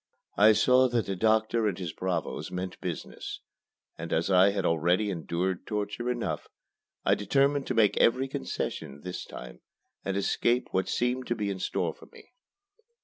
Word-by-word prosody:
I 110 +2 +7
saw 130 +4 +5
that 120 -3 0
the 100 - -2
doctor 110 +2 +2
and 95 -4 -1
his 85 -4 -5
bravos 90 -3 -3
meant 90 +1 -5
business; - - -5 0.6
and - - -6
as 85 +4 +1
I 95 +1 +6
had 100 -2 -1
already 90 +6 +2
endured 90 +2 -2
torture 105 +3 -2
enough, 120 -1 -2 0.6
I - - +5
determined 135 +7 +2
to 130 - -1
make 110 -2 +4
every 130 +3 +3
concession 70 - -4
this 90 +2 -6
time - - -10 0.4
and 95 0 -2
escape 120 +5 +1
what 95 - 0
seemed 125 +1 0
to 120 - 0
be 105 -3 -2
in 95 - -5
store - - -1
for - - -16
me. - - -17
100 Hz, 165 wpm, -28 LUFS, 90-120 Hz, 0.6 s, I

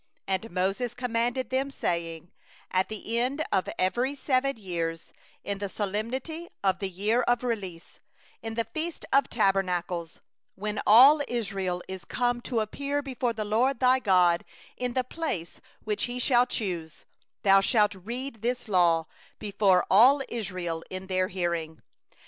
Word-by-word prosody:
10And 195 +4 -2
Moses 200 +6 -1
commanded 245 +1 -1
them, 265 +1 0
saying: 170 - -3 0.4
'At 185 0 +1
the 220 +2 -3
end 275 +6 0
of 190 -2 +1
every 245 +9 0
seven 275 -1 0
years, 165 -5 -4 0.3
in 200 -1 -3
the 200 -1 -3
set 200 0 -3 0.3
time 330 +1 -7
of 190 -1 +2
the 195 - -2
year 210 +6 +1
of 245 0 +1
release, 195 -8 -4 0.4
in 225 0 -5
the 230 - +1
feast 315 +8 -5
of 275 +1 +4
tabernacles, 180 -5 0 0.4
11when 210 +1 -2
all 270 +8 +8
Israel 195 -6 -2
is 190 -1 -7
come 245 -1 -1
to 235 -2 -1
appear 280 +6 -2
before 250 -3 -2
the 215 -1 -3
LORD 235 +5 +1
thy 255 0 +4
God 180 -6 +3 0.3
in 250 -1 -3
the 255 - +1
place 250 - -4 0.2
which 210 -1 -1
He 245 0 -5
shall 250 0 +3
choose, 175 -10 -4 0.4
thou 195 -1 +6
shalt 210 0 +3
read 230 +5 -6
this 245 +1 -2
law 170 -5 +3 0.3
before 200 -3 +2
all 260 +8 +7
Israel 185 -7 -4
in 185 0 -6
their 185 -1 0
hearing. 170 -4 -3
215 Hz, 150 wpm, -27 LUFS, 185-245 Hz, 0.4 s, all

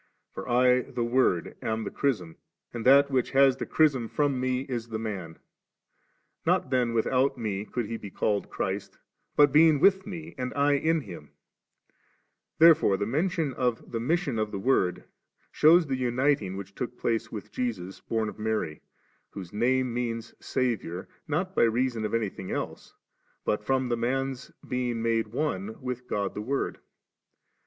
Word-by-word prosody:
For - - -7
I 125 +1 +4
the 120 - -4
Word 120 -8 +1
am 110 0 -2
the - - -5
chrism, 100 - -1 0.4
and 120 0 -3
that 140 +1 +6
which 130 -2 +1
has 135 -1 +5
the - - -4
chrism 140 -7 +2
from 145 -3 0
Me 130 0 0
is 120 -4 -4
the 110 -1 -4
Man*; 95 -7 -5 1.1
not 130 - +1
then 125 -3 +1
without 130 +4 +2
Me 105 -3 -3
could 120 +1 -3
He 115 +2 -4
be 105 - -8
called 100 +1 -1
Christ, 100 +1 -4 0.4
butbeingwithMeandIinHinL 150 - +2 1.3
There 165 +1 +9
fore 105 -11 +1
tiie 100 +1 -2
mention 155 +2 0
of 125 -3 -2
the 115 - -2
mission 140 -1 0
of 110 -1 0
the - - -3
Word 95 -4 +1 0.5
shews 165 +3 +6
tiie 135 -3 -2
uniting 125 -5 +1
which 100 0 -8
took 125 +1 -5
place 115 -1 -1
with 105 -3 -7
Jesus, 100 -7 -4
bom 110 -1 -1
of 105 - -8
Mary, 105 -8 -2 0.5
Wbose 95 -3 -8
Name 125 +3 +1
means 115 -1 -3
Saviour, 110 -8 -2 0.2
not 180 +5 -1
by - - +2
reason 115 -1 +1
of 105 - -1
anything 100 -4 -3
else, - - -5 0.5
but 105 - 0
from 130 +2 +1
the 120 - 0
Man's 135 +2 -2 0.2
being 120 -2 -2
made 115 -1 +1
one 110 -4 -3
with 125 -1 -5
God 100 -1 -2
the 105 - -5
Word. 135 +6 -2
120 Hz, 150 wpm, -27 LUFS, 110-135 Hz, 1.3 s, There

